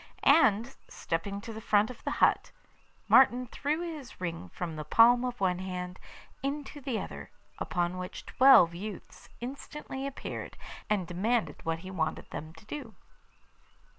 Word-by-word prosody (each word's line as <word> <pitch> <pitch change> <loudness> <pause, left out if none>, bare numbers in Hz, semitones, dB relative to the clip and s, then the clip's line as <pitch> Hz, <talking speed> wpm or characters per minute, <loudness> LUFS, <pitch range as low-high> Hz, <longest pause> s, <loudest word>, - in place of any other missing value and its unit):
And, 230 -4 +4
stepping 200 +5 -3
to 225 - -7
the 220 - -7
front 210 +2 +3
of 245 - -13
the - - -1 0.2
hut, - - 0 0.6
Martin 250 -1 +6
threw 295 +6 -2
his 315 -7 -7
ring 170 - -4
from 165 - -5
the 155 - -5
palm 235 +9 +6
of 245 -1 -3
one 180 -2 +1
hand 180 -1 -5 0.4
into 290 +1 -4
the 250 -5 -2
other, - - -7 0.3
upon 175 +1 -1
which 180 0 -7
twelve 255 -11 +7
youths 200 +3 -8
instantly 270 +1 -6
appeared, 275 - -6 0.3
and 205 -4 +1
demanded 210 +7 -1
what 165 0 -1
he 190 - -6
wanted 160 -4 -2
them 155 +1 -6
to 160 - -16
do. 235 -3 -7
215 Hz, 150 wpm, -30 LUFS, 180-260 Hz, 0.6 s, twelve